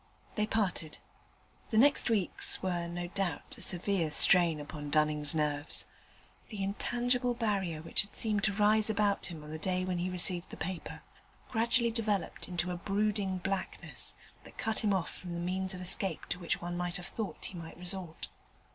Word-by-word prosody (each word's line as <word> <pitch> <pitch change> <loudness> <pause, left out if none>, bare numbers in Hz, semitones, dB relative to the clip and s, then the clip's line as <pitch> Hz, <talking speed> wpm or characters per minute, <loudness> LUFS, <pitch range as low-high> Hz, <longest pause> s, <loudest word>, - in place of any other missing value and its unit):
They 210 -1 0
parted. 190 -8 -1 0.7
The 220 - 0
next 280 +2 +4
weeks 205 -6 +3
were 175 -2 -1
no 175 +1 -4
doubt 180 -5 -3
a - - -11
severe 180 -2 +2
strain 170 +1 +6
upon 145 0 -7
Dunning's 150 0 +4
nerves: 150 -1 0 0.6
the 205 -3 -4
intangible 245 +5 0
barrier 195 -9 -1
which - - +2
had 200 - -9
seemed 210 -3 0
to 200 - +2
rise 215 +1 +3
about 205 -1 +1
him 160 -4 -8
on 150 - -9
the 155 - -5
day 185 +1 0
when 180 -1 -1
he 180 +1 -1
received 180 -1 +1
the - - -9
paper, 180 +1 -5 0.5
gradually 235 +1 +2
developed 215 -4 -2
into 180 0 -2
a 175 - -3
brooding 200 0 0
blackness 190 +1 -4 0.3
that - - -15
cut 220 0 +1
him 210 - +2
off 190 -3 0
from 175 -2 -7
the - - -3
means 185 +2 -2
of 180 - -7
escape 180 -1 +2
to 180 - -2
which 170 - -1
one 175 0 -4
might 175 0 -2
have 180 - -4
thought 215 +1 -5
he - - -6
might 165 -3 -8
resort. 180 -2 -4
185 Hz, 180 wpm, -32 LUFS, 170-210 Hz, 0.7 s, strain